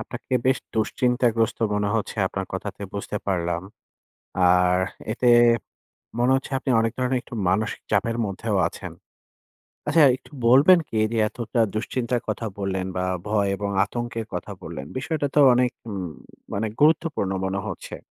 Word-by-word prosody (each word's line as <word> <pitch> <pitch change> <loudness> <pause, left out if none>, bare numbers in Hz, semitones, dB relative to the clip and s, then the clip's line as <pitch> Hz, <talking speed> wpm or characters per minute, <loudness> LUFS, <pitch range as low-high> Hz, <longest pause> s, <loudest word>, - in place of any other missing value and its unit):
আপনাকে 120 +2 -5
বেশ 130 - +3 0.2
দুশ্চিন্তাগ্রস্ত 115 0 +1 0.2
মনে 105 0 0
হচ্ছে 110 - -3
আপনার 95 0 -4
কথাতে 100 +1 -5
বুঝতে 100 +1 -4
পারলাম। 85 -3 -1 0.8
আর 90 0 +4 0.3
এতে 125 +2 0 0.9
মনে 120 +2 +3
হচ্ছে 135 - -1
আপনি 130 - -3
অনেক 115 0 0
ধরনের 130 0 +1
একটু 120 - -10
মানসিক 105 +5 0
চাপের 115 +3 +1
মধ্যেও 100 +2 -2
আছেন। - - -9 1.0
আচ্ছা 165 - +4 0.2
একটু - - -21 0.2
বলবেন 140 +9 +7
কী? 110 - -3
যে 115 - -1
এতটা 120 +1 -3
দুশ্চিন্তার 120 +2 -1
কথা 115 - -2
বললেন 95 -1 -2
বা 90 - 0 0.2
ভয় 105 -1 +1
এবং 100 +1 -3
আতঙ্কের 115 +1 -4
কথা - - -4
বললেন 65 - -7
বিষয়টা 145 +2 -1
তো - - +5
অনেক 125 0 +2 0.2
উম 95 -3 -4 0.5
মানে 105 +3 -1
গুরুত্বপূর্ণ 150 - +2
মনে 95 +1 -1
হচ্ছে। - - -6
110 Hz, 145 wpm, -24 LUFS, 100-125 Hz, 1.0 s, বলবেন